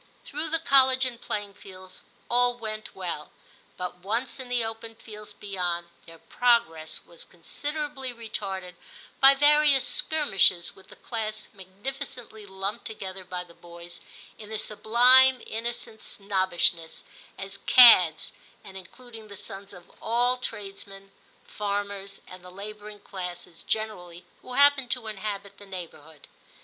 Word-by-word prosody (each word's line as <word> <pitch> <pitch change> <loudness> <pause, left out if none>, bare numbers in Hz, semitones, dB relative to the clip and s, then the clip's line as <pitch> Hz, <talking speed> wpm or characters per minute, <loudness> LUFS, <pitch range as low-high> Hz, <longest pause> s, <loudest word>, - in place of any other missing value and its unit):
Through 305 +3 -4
the 325 - +1
College 265 -3 +4
and 240 -2 -4
playing 205 -1 -4
fields 185 -1 -13 0.3
all 245 0 +3
went 215 -2 -7
well, 170 -5 -5 0.5
but 180 -1 -5
once 225 +9 -3
in 255 -1 -8
the 245 -2 0
open 225 0 -7
fields 210 -1 -11
beyond, 180 -4 -3 0.2
their 165 0 -12
progress 165 -9 0
was 170 - -7
considerably 290 - -5
retarded 200 -6 -6 0.5
by 270 +1 +8
various 290 -1 +4
skirmishes 195 - +2
with 190 - -18
the - - -15
class 215 -2 -5
magnificently 220 +3 -8
lumped 195 +1 -3
together 195 -3 -7
by 180 -1 -5
the 175 -1 -18
boys, 170 0 -12 0.4
in 210 -1 -11
their 220 - -4
sublime 250 +5 +6
innocent 225 -1 -5
snobbish 190 -4 +2
ness, 165 -1 -11 0.3
as 195 0 -7
*cads,' 185 -10 +7 0.3
and 195 -2 -11
including 225 +3 -12
the 200 -1 -10
sons 195 0 -10
of 180 -3 -14
all 245 +2 +2
tradesmen, 195 -4 -8 0.3
farmers, 200 -1 -4
and 185 0 -13
the 180 - -11
labouring 210 +2 -10
classes 180 -2 -8
generally, 180 -6 -3 0.2
who 250 - -10
happened 280 -1 +5
to 245 -2 -1
inhabit 205 -1 -6
the 205 - -13
neigh 185 -2 -6
bourhood. 155 -1 -17
205 Hz, 135 wpm, -26 LUFS, 185-245 Hz, 0.5 s, by